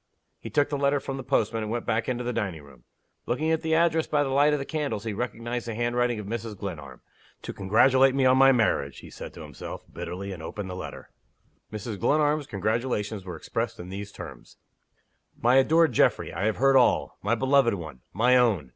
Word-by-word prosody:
He -, -, -8 dB
took 145 Hz, -1 st, +2 dB
the 145 Hz, -1 st, -2 dB
letter 140 Hz, 0 st, +2 dB
from 135 Hz, 0 st, -5 dB
the 135 Hz, -, -6 dB
postman, 115 Hz, -4 st, 0 dB
and 110 Hz, 0 st, -4 dB
went 120 Hz, 0 st, -3 dB
back 110 Hz, +2 st, 0 dB
into 125 Hz, -1 st, -2 dB
the 125 Hz, 0 st, -2 dB
dining 90 Hz, -9 st, -3 dB
room. 65 Hz, -4 st, -18 dB, 0.4 s
Looking 155 Hz, +6 st, 0 dB
at 160 Hz, -, +1 dB
the 160 Hz, 0 st, +1 dB
address 165 Hz, -1 st, +2 dB
by 145 Hz, -1 st, +2 dB
the 135 Hz, -, -2 dB
light 145 Hz, +2 st, +4 dB
of 150 Hz, -, +2 dB
the 135 Hz, -, -4 dB
candles, 145 Hz, -10 st, -3 dB
he 110 Hz, -2 st, -3 dB
recognized 120 Hz, +1 st, -4 dB
the 115 Hz, -, -4 dB
handwriting 120 Hz, 0 st, 0 dB
of 105 Hz, -, -6 dB
Mrs. 110 Hz, 0 st, -5 dB
Glenarm. 75 Hz, -10 st, -7 dB, 0.4 s
"To -, -, -6 dB
congratulate 130 Hz, +7 st, +4 dB
me 135 Hz, -1 st, +2 dB
on 130 Hz, 0 st, +6 dB
my 135 Hz, 0 st, +7 dB
marriage!" 110 Hz, -, 0 dB
he -, -, -12 dB
said -, -, -8 dB
to -, -, -9 dB
himself, -, -, -8 dB
bitterly, 90 Hz, +3 st, -5 dB
and 90 Hz, -4 st, -7 dB
opened 95 Hz, +3 st, -6 dB
the -, -, -5 dB
letter. 90 Hz, -, -8 dB, 0.6 s
Mrs. 110 Hz, -1 st, -5 dB
Glenarm's 150 Hz, +3 st, +2 dB
congratulations 105 Hz, -1 st, -2 dB
were 90 Hz, -2 st, -6 dB
expressed 80 Hz, -, -4 dB
in 90 Hz, -, -8 dB
these 100 Hz, +2 st, -6 dB
terms: -, -, -11 dB, 0.8 s
"MY 120 Hz, +3 st, +4 dB
ADORED 160 Hz, +3 st, +4 dB
GEOFFREY, -, -, +2 dB
I 90 Hz, +5 st, -2 dB
have 110 Hz, -, 0 dB
heard 135 Hz, +1 st, +4 dB
all. 125 Hz, -, +2 dB
My 105 Hz, +4 st, +1 dB
beloved 130 Hz, -2 st, +3 dB
one! 80 Hz, -8 st, -9 dB
my 120 Hz, +5 st, +3 dB
own! 105 Hz, -, +2 dB
120 Hz, 210 wpm, -26 LUFS, 100-135 Hz, 0.8 s, my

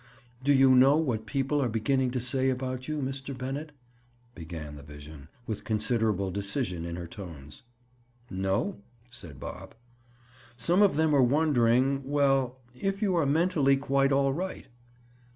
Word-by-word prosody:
"Do 145 Hz, -, +3 dB
you 135 Hz, -1 st, +6 dB
know 135 Hz, +3 st, +6 dB
what 120 Hz, -9 st, -1 dB
people 135 Hz, +4 st, 0 dB
are 125 Hz, -, 0 dB
beginning 130 Hz, +4 st, +1 dB
to 125 Hz, +1 st, -2 dB
say 130 Hz, +2 st, +1 dB
about 130 Hz, 0 st, -3 dB
you, 155 Hz, -2 st, -2 dB
Mr. 135 Hz, 0 st, -5 dB
Bennett?" 135 Hz, +4 st, -5 dB, 0.6 s
began 80 Hz, -5 st, -8 dB
the 70 Hz, -, -10 dB
vision, 75 Hz, 0 st, -12 dB, 0.2 s
with 110 Hz, -4 st, -5 dB
considerable 110 Hz, -3 st, 0 dB
decision 100 Hz, -3 st, -2 dB
in 85 Hz, 0 st, -5 dB
her 85 Hz, 0 st, -6 dB
tones. 80 Hz, -6 st, -10 dB, 0.7 s
"No," 95 Hz, +1 st, -2 dB, 0.3 s
said 85 Hz, -, -10 dB
Bob. -, -, -9 dB, 0.8 s
"Some 170 Hz, -, +2 dB
of 200 Hz, -8 st, +4 dB
them 155 Hz, 0 st, +2 dB
are 140 Hz, -, +5 dB
wondering—well, 135 Hz, 0 st, +2 dB, 0.2 s
if 195 Hz, -, -2 dB
you 190 Hz, -3 st, +2 dB
are 160 Hz, -5 st, +2 dB
mentally 145 Hz, -3 st, +3 dB
quite 135 Hz, 0 st, +1 dB
all 135 Hz, 0 st, +2 dB
right." 185 Hz, +5 st, -5 dB
130 Hz, 145 wpm, -28 LUFS, 100-140 Hz, 0.8 s, you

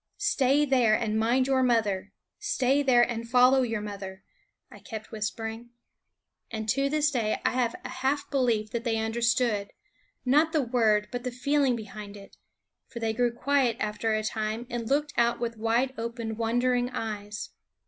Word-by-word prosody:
"Stay 290 Hz, -8 st, +2 dB
there, 250 Hz, -6 st, +4 dB
and 220 Hz, -1 st, 0 dB
mind 240 Hz, +4 st, +2 dB
your 265 Hz, -1 st, +2 dB
mother; 215 Hz, -6 st, +1 dB, 0.3 s
stay 280 Hz, -9 st, +1 dB
there, 250 Hz, -4 st, +5 dB
and 230 Hz, -1 st, -3 dB
follow 250 Hz, +2 st, +5 dB
your 230 Hz, -4 st, -1 dB
mother," 195 Hz, -2 st, -7 dB, 0.5 s
I -, -, -12 dB
kept 220 Hz, -2 st, -8 dB
whispering. 225 Hz, +2 st, -4 dB, 0.8 s
And 220 Hz, -1 st, -5 dB
to 275 Hz, +4 st, +2 dB
this 300 Hz, 0 st, +2 dB
day 225 Hz, -5 st, 0 dB
I -, -, +3 dB
have 245 Hz, -2 st, 0 dB
a -, -, -4 dB
half 270 Hz, +3 st, -1 dB
belief 235 Hz, -6 st, +1 dB
that 235 Hz, -1 st, -3 dB
they 230 Hz, -2 st, 0 dB
understood, 225 Hz, -1 st, +1 dB, 0.6 s
not 300 Hz, +6 st, +3 dB
the 305 Hz, -3 st, +2 dB
word 220 Hz, -4 st, +2 dB
but 245 Hz, 0 st, -4 dB
the 255 Hz, -, -2 dB
feeling 265 Hz, +1 st, +1 dB
behind 210 Hz, -2 st, -8 dB
it; 200 Hz, 0 st, -14 dB, 0.5 s
for -, -, -11 dB
they 225 Hz, -1 st, -1 dB
grew 240 Hz, +1 st, +1 dB
quiet 255 Hz, -1 st, +1 dB
after 215 Hz, +1 st, -1 dB
a 215 Hz, -, -1 dB
time 220 Hz, +2 st, -2 dB
and 235 Hz, -1 st, -3 dB
looked 295 Hz, +2 st, +1 dB
out 235 Hz, 0 st, +2 dB
with 230 Hz, -1 st, -3 dB
wide 230 Hz, +4 st, +1 dB
open, 230 Hz, -1 st, -4 dB
wondering 245 Hz, +2 st, +1 dB
eyes. 210 Hz, -3 st, -5 dB
235 Hz, 170 wpm, -27 LUFS, 220-255 Hz, 0.8 s, there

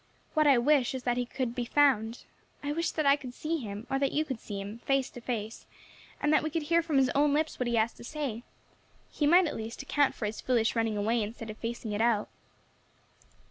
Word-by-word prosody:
What 310 Hz, -2 st, +3 dB
I 275 Hz, -3 st, +6 dB
wish 265 Hz, 0 st, +3 dB
is 255 Hz, -, -5 dB
that 245 Hz, 0 st, 0 dB
he 245 Hz, -1 st, -1 dB
could 250 Hz, -2 st, -3 dB
be 245 Hz, -1 st, -2 dB
found. 240 Hz, -3 st, +2 dB, 0.4 s
I 290 Hz, -, -1 dB
wish 335 Hz, +3 st, 0 dB
that 310 Hz, -, -2 dB
I 280 Hz, 0 st, +6 dB
could 255 Hz, -4 st, -9 dB
see 325 Hz, +1 st, -2 dB
him, 210 Hz, -2 st, -6 dB
or 270 Hz, 0 st, 0 dB
that 275 Hz, -1 st, +1 dB
you 310 Hz, +1 st, 0 dB
could 260 Hz, -6 st, -4 dB
see 205 Hz, -2 st, -6 dB
him, 205 Hz, +3 st, -7 dB
face 270 Hz, +1 st, 0 dB
to 245 Hz, -, -10 dB
face, 225 Hz, -2 st, -4 dB, 0.5 s
and 295 Hz, +1 st, +2 dB
that -, -, +5 dB
we 310 Hz, -, -2 dB
could 320 Hz, 0 st, -2 dB
hear 335 Hz, +3 st, +3 dB
from 320 Hz, -4 st, 0 dB
his 260 Hz, -2 st, +4 dB
own 285 Hz, 0 st, +3 dB
lips 310 Hz, +1 st, -1 dB
what 250 Hz, -, 0 dB
he 240 Hz, -, 0 dB
has 225 Hz, +1 st, +2 dB
to -, -, -13 dB
say. 265 Hz, -4 st, -4 dB, 0.7 s
He 295 Hz, -, 0 dB
might, 350 Hz, +4 st, +6 dB
at 300 Hz, -, -3 dB
least, 225 Hz, +4 st, -6 dB
account 285 Hz, 0 st, +2 dB
for 215 Hz, -, -4 dB
his 210 Hz, +1 st, -4 dB
foolish 235 Hz, -3 st, +1 dB
running 225 Hz, -2 st, 0 dB
away 225 Hz, +3 st, +1 dB
instead 220 Hz, +1 st, -5 dB
of 215 Hz, -, -11 dB
facing 230 Hz, -1 st, -4 dB
it 205 Hz, +1 st, -1 dB
out. 225 Hz, -3 st, +2 dB
250 Hz, 240 wpm, -29 LUFS, 225-290 Hz, 0.7 s, I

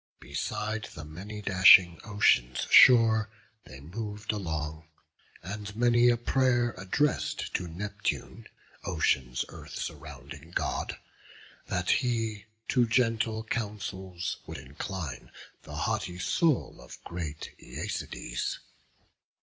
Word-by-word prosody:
Beside 110 Hz, 0 st, -3 dB
the 75 Hz, -, -8 dB
many 100 Hz, +7 st, -8 dB
dashing 95 Hz, -3 st, +7 dB
ocean's 65 Hz, -, +2 dB
shore 110 Hz, -3 st, +7 dB, 0.4 s
They 65 Hz, +1 st, -11 dB
mov'd 105 Hz, +6 st, -5 dB
along; 80 Hz, -6 st, -4 dB, 0.6 s
and 105 Hz, +3 st, -6 dB
many 120 Hz, +1 st, +4 dB
a 120 Hz, -, +3 dB
pray'r 120 Hz, -1 st, +2 dB
address'd 100 Hz, +11 st, -1 dB
To 90 Hz, -, -1 dB
Neptune, 95 Hz, +5 st, -4 dB, 0.4 s
Ocean's 65 Hz, -1 st, 0 dB
Earth -, -, -10 dB
surrounding 80 Hz, -, -8 dB
God, -, -, -2 dB, 0.7 s
That 90 Hz, 0 st, 0 dB
he 115 Hz, -5 st, 0 dB, 0.2 s
to 120 Hz, -2 st, +3 dB
gentle 115 Hz, -1 st, +1 dB
counsels 100 Hz, -5 st, -4 dB
would 80 Hz, -, -6 dB
incline 75 Hz, +4 st, -6 dB, 0.3 s
The -, -, -10 dB
haughty 90 Hz, 0 st, -2 dB
soul 155 Hz, -, +1 dB
of -, -, -11 dB
great 80 Hz, -3 st, -6 dB
Æacides. -, -, -4 dB
100 Hz, 100 wpm, -29 LUFS, 85-115 Hz, 0.7 s, dashing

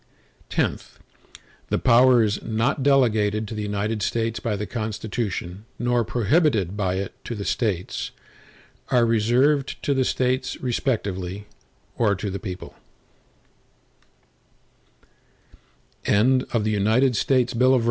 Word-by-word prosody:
X -, -, -1 dB, 0.7 s
The -, -, +1 dB
powers 120 Hz, -3 st, +4 dB
not 115 Hz, +5 st, -1 dB
delegated 110 Hz, -6 st, +2 dB
to 110 Hz, -, -6 dB
the 105 Hz, -, -4 dB
United 105 Hz, +1 st, -2 dB
States 115 Hz, +2 st, -1 dB
by 105 Hz, -1 st, -2 dB
the 105 Hz, +1 st, -3 dB
Constitution, 105 Hz, -3 st, -4 dB
nor 120 Hz, 0 st, +1 dB
prohibited 115 Hz, -, +1 dB
by 95 Hz, -3 st, -1 dB
it 95 Hz, +1 st, -4 dB
to 120 Hz, -, -5 dB
the 100 Hz, -2 st, -5 dB
States, 100 Hz, -7 st, -2 dB, 0.8 s
are 120 Hz, -2 st, +4 dB
reserved 125 Hz, +6 st, +2 dB
to 140 Hz, -, +1 dB
the 135 Hz, -1 st, +2 dB
States 130 Hz, +1 st, -1 dB
respectively, 100 Hz, -7 st, -2 dB, 0.5 s
or 105 Hz, -4 st, +3 dB
to 100 Hz, +1 st, -4 dB
the 100 Hz, -, -4 dB
people. 90 Hz, -2 st, -7 dB
110 Hz, 95 wpm, -23 LUFS, 100-125 Hz, 0.8 s, powers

